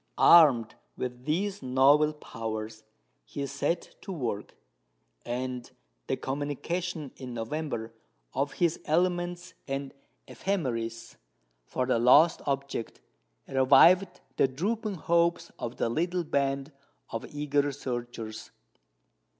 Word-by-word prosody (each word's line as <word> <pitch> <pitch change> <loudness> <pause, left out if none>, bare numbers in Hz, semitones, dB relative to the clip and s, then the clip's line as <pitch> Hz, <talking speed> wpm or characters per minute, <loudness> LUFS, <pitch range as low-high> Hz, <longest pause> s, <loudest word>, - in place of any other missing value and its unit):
Armed 135 -10 +7 0.2
with 125 0 -5
these 190 +6 -1
novel 135 +4 +4
powers, 110 -5 -6 0.4
he 140 - -5
set 145 +5 -2
to 195 - -7
work; 120 - -4 0.7
and 125 0 -3 0.4
the - - 0
communication 145 +3 -3
in 125 -2 -7
November 115 -1 -4 0.4
of 140 +2 -1
his 170 -2 +1
elements 175 +1 0
and 135 0 -4 0.3
ephemeris 115 - -3 0.5
for 125 - -1
the 125 -2 +2
lost 150 +8 +6
object 140 -4 -3 0.5
revived 170 +8 +5 0.2
the - - +5
drooping 205 - -2
hopes 170 0 +1
of 120 0 -5
the - - +1
little 175 +8 0
band 140 -1 -1 0.4
of - - -4
eager 145 -1 0
searchers. 120 -5 -6
140 Hz, 105 wpm, -28 LUFS, 125-170 Hz, 0.7 s, Armed